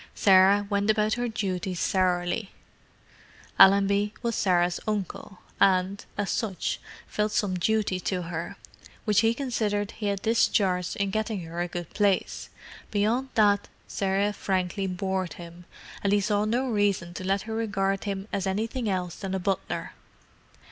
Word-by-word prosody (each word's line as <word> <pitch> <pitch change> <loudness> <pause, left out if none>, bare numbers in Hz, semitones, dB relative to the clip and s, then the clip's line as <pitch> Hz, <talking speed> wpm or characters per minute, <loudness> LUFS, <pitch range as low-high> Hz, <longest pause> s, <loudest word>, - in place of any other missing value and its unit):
Sarah 195 +1 +5
went 200 0 0
about 215 0 +2
her 245 0 -1
duties 190 -5 -3
sourly. 185 +2 0 1.1
Allenby 200 +2 +5
was 235 -1 0
Sarah's 175 -4 +2
uncle, 200 -2 -4 0.2
and, 190 0 +3
as 205 -1 -1
such, 210 -6 -2 0.3
felt 210 0 -1
some 205 -3 0
duty 210 -1 +1
to 180 0 -2
her, 165 0 -5 0.5
which 210 -3 +4
he 225 0 +2
considered 215 -6 -1
he 210 - -4
had 200 -1 -2
discharged 190 -5 +2
in 200 -1 -1
getting 215 -1 -2
her 165 +1 -5
a 175 - -1
good 175 -1 -6
place; 205 -2 0 0.4
beyond 225 +6 0
that, 205 -2 +3 0.2
Sarah 200 +1 0
frankly 190 0 -1
bored 185 0 -2
him, 170 0 -11 0.4
and 200 - +2
he 205 - +4
saw 205 +1 +1
no 245 +5 0
reason 205 -6 0
to 185 - -6
let 195 +1 0
her 220 - -6
regard 195 -3 -1
him 200 0 -3
as 195 -1 -1
anything 220 +4 -2
else 180 -3 -2
than 190 -2 -4
a - - -1
butler. 195 +1 -2
200 Hz, 150 wpm, -27 LUFS, 185-210 Hz, 1.1 s, Sarah